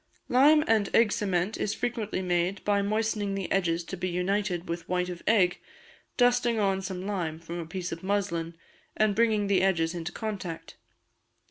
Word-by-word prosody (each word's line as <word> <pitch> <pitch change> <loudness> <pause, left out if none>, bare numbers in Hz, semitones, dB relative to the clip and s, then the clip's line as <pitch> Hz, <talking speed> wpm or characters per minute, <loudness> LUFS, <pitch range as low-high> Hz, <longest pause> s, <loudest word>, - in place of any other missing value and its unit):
Lime 295 +5 +6
and 220 -3 +2
Egg 230 -3 +5
Cement 195 -1 0
is 210 - -1
frequently 225 -5 -2
made 180 +2 0
by 205 -1 +2
moistening 210 -1 -1
the 195 -2 -4
edges 170 -3 +1
to 190 - -6
be 185 0 -3
united 180 0 -1
with 170 0 -5
white 180 0 0
of 175 -1 -7
egg, 190 -5 +3 0.6
dusting 245 -1 +3
on 195 -2 +1
some 190 -1 -5
lime 175 -6 -2
from 170 +1 -6
a 165 - -6
piece 180 +1 -5
of 165 - -5
muslin, 185 -4 -1 0.4
and 215 -1 +3
bringing 220 -2 +2
the 195 -2 +2
edges 170 -3 +1
into 170 -1 -4
contact. 195 -7 -6
195 Hz, 170 wpm, -28 LUFS, 175-210 Hz, 0.6 s, Lime